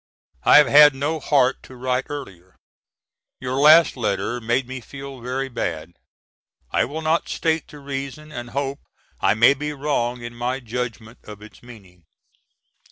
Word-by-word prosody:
I - - +7
have 150 - +7
had 145 -1 +7
no 150 +4 -2
heart 135 -3 +2
to 130 - -14
write 125 +1 -2
earlier. 95 -11 -9 0.8
Your 130 +1 -3
last 155 +3 +7
letter 120 +1 -2
made 120 +3 0
me 130 0 -7
feel 135 +1 -10
very 130 +3 -3
bad. 85 -9 -4 0.8
I - - +2
will 155 +6 -6
not 160 +2 0
state 160 -2 -1
the 150 - -13
reason 140 +2 -7
and 120 -3 -7
hope 140 +2 -3 0.4
I - - +2
may 115 +5 +6
be 150 +2 -5
wrong 125 -4 -2
in 120 0 -7
my 120 +2 -3
judgment 120 -1 -6
of 105 -1 -11
its 105 - -15
meaning. 95 -8 -16
130 Hz, 160 wpm, -22 LUFS, 120-145 Hz, 0.8 s, I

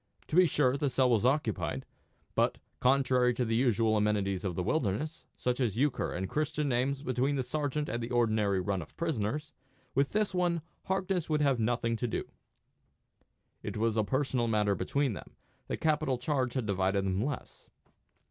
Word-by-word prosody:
To - - -2
be 180 0 +7
sure, 135 -3 +2
the 145 -1 0
cell 130 0 +3
was 115 -1 +3
occupied; 115 - 0 0.5
but, - - +2 0.2
contrary 125 -2 +3
to 125 - 0
the 115 0 0
usual 115 -3 +3
amenities 100 -3 +1
of 95 -4 -2
the 90 - -1
wilderness, 140 - -1
such 125 0 -1
as 115 -5 0
euchre 140 +1 +1
and 95 +2 -3
Christian 150 +2 -1
names 135 +2 0
between 130 +2 0
the 130 - 0
sergeant 145 +2 -2
and 120 - -2
the 115 - -4
ordinary 110 -5 +2
run 95 0 -1
of - - -12
prisoners, 150 -2 -2 0.4
with 140 +1 +2
this 215 -2 +1
one 175 -3 +1 0.2
Harkness 190 -3 -1
would 150 -1 +2
have 135 -4 +2
nothing 115 +1 +1
to 120 - -1
do. 110 - -2 1.4
It - - -5
was 110 0 +1
a 110 - +2
personal 130 0 0
matter 105 -2 +2
between 135 +7 0
them: - - -10 0.3
the - - -2
capital 155 -4 +1
charge 130 -1 -1
had 130 -4 0
divided 95 0 +1
them 95 +2 0
less. 145 0 -6
125 Hz, 175 wpm, -31 LUFS, 110-145 Hz, 1.4 s, be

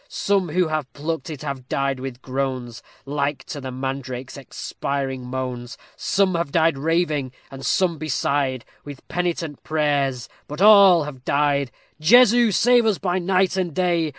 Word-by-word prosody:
Some 195 -3 0
who 175 +1 +1
have 155 -4 -3
plucked 155 0 -4
it 155 -2 -7
have 135 -3 -6
died 135 -1 -1
with 130 -1 -7
groans, 130 -3 -3 0.2
Like 140 0 -2
to 165 -6 -7
the 130 - -6
mandrake's 130 -1 -5
expiring 135 -1 -4
moans; 125 -1 -5 0.2
Some 195 -2 +1
have 170 -4 -2
died 165 -1 +3
raving, 150 -3 -1 0.2
and 135 0 -9
some 175 -4 +1
beside 140 -4 -1 0.2
With 145 -2 -11
penitent 170 -4 -3
prayers 145 -5 0 0.2
but 150 - -7
all 200 -5 +7
have 135 -4 -9
died. 140 -2 +1 0.3
_Jesu! 240 +5 +6
save 240 +3 +4
us 210 -4 +2
by 185 -1 -1
night 185 +1 +1
and 175 -5 -2
day! 170 -3 +1
145 Hz, 150 wpm, -22 LUFS, 135-175 Hz, 0.3 s, all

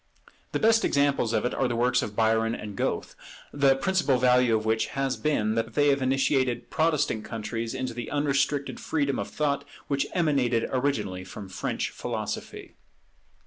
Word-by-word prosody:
The - - 0
best 225 +1 +4
examples 140 -5 +2
of 110 -1 0
it 125 - -1
are 130 - +1
the 120 - -2
works 125 +1 +2
of 105 - -5
Byron 115 +1 +2
and 105 -1 -7
Goethe, - - -2 0.4
the 140 -2 +4
principle 155 -2 +1
value 125 -2 +4
of 110 - -5
which 110 0 +1
has 135 -1 0
been, 110 -8 0
that 115 0 -2
they 145 0 +4
have 140 -1 +2
initiated 130 -1 +1
Protestant 150 -8 +1
countries 115 +1 -4
into 130 -2 -3
the 120 -1 -5
unrestricted 145 0 0
freedom 140 -3 -1
of - - -3
thought 140 -2 -1 0.3
which 140 -1 0
emanated 135 -9 +1
originally 110 -9 -1
from 95 +1 -9
French 95 - -3
philosophy. - - -5
130 Hz, 165 wpm, -27 LUFS, 115-140 Hz, 0.4 s, best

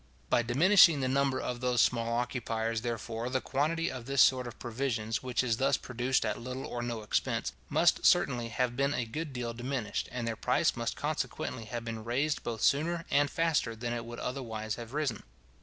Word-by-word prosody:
By - - +5
diminishing 160 - +6
the 130 - +1
number 135 0 +1
of 125 -1 -3
those 125 -1 +1
small 115 -1 +2
occupiers, 115 -2 -2
therefore, 115 0 -3
the 130 0 +1
quantity 160 +6 0
of 130 -2 -7
this 140 0 0
sort 130 -2 +3
of 120 - -9
provisions, 115 -2 -2
which 125 -1 0
is 115 -3 +1
thus 135 +1 +2
produced 125 +2 -1
at - - -2
little 130 +2 -5
or 120 - -4
no 120 -2 -4
expense, 105 - -1 0.2
must - - +3
certainly 120 -1 +3
have 120 +1 -1
been 140 +2 +1
a 125 - -1
good 150 +7 -5
deal 120 -2 -4
diminished, 120 -3 -3
and 120 -2 -3
their 115 - -1
price - - +1
must - - -2
consequently 115 - -3
have 115 +1 -5
been 115 -1 -5
raised 140 +6 0
both 115 -2 -4
sooner 165 +4 +2
and 145 +1 +3
faster 160 -9 +1
than 120 +1 -3
it 120 -1 -3
would 120 0 -8
otherwise 110 -5 -4
have 120 +2 -7
risen. 150 -2 -1
125 Hz, 195 wpm, -31 LUFS, 115-135 Hz, 0.2 s, diminishing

